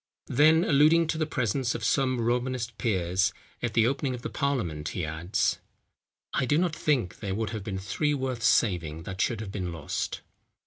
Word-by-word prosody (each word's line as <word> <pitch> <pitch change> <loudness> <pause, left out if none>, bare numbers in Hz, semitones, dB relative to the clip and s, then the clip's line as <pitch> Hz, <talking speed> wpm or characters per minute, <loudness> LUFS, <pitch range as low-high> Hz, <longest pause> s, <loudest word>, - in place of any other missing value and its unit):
Then 155 +5 +6
alluding 155 +3 +5
to 160 - -1
the 155 - 0
presence 125 -2 0
of 115 - -5
some 130 +2 +2
Romanist 120 0 -1
peers 95 -3 +1 0.3
at 120 -3 -2
the 115 -1 +5
opening 135 +1 0
of 120 - -10
parliament, 110 - -1
he 90 - -1
adds: 80 +4 0 0.7
"I 130 - +1
do 150 - +3
not 170 -2 +1
think 130 - 0
there 100 -3 -3
would 110 -1 -2
have 110 -3 -5
been 100 -2 -4
three 145 +10 -1
worth 130 -3 -3
saving 85 -9 +2
that 95 +2 -4
should 115 -4 0
have 100 -3 -6
been 90 -4 -3
lost." 80 -3 -4
120 Hz, 180 wpm, -28 LUFS, 95-140 Hz, 0.7 s, Then